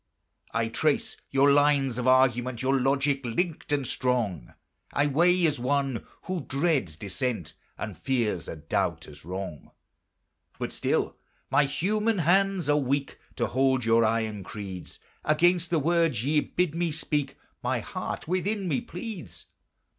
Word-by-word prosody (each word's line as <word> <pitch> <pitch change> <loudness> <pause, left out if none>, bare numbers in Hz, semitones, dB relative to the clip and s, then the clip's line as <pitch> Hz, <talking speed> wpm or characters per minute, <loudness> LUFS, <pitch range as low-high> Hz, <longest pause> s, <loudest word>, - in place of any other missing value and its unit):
I 115 0 0
trace 145 +6 0
your 140 +1 +4
lines 140 -3 +3
of 125 - -1
argument; 130 -1 +3
Your 135 +1 +3
logic 135 +1 +1
linked 155 +7 -2
and 140 -2 +1
strong 115 - -1 0.4
I 145 - +2
weigh 175 +5 +4
as 150 -4 +1
one 135 -1 0 0.2
who 185 -1 -2
dreads 140 - 0
dissent, 100 - -3 0.2
And - - -5
fears 115 -10 -1
a - - -5
doubt 80 +1 -2
as 75 -1 -12
wrong. 90 -2 -6 0.9
But - - -4
still - - 0 0.3
my 145 +1 +5
human 210 +9 0
hands 190 +1 +2
are 145 0 +4
weak 140 0 -1 0.2
To 120 - 0
hold 130 -1 +2
your 115 0 +4
iron 110 -2 0
creeds: 95 -2 -7 0.3
Against 175 +3 +3
the 170 - +2
words 165 -6 +2
ye 150 +2 +3
bid 175 +1 -1
me 170 0 0
speak 150 -2 -1 0.2
My - - 0
heart - - -5
within 190 +3 -1
me 205 - 0
pleads. 185 - -8
135 Hz, 145 wpm, -27 LUFS, 115-165 Hz, 0.9 s, my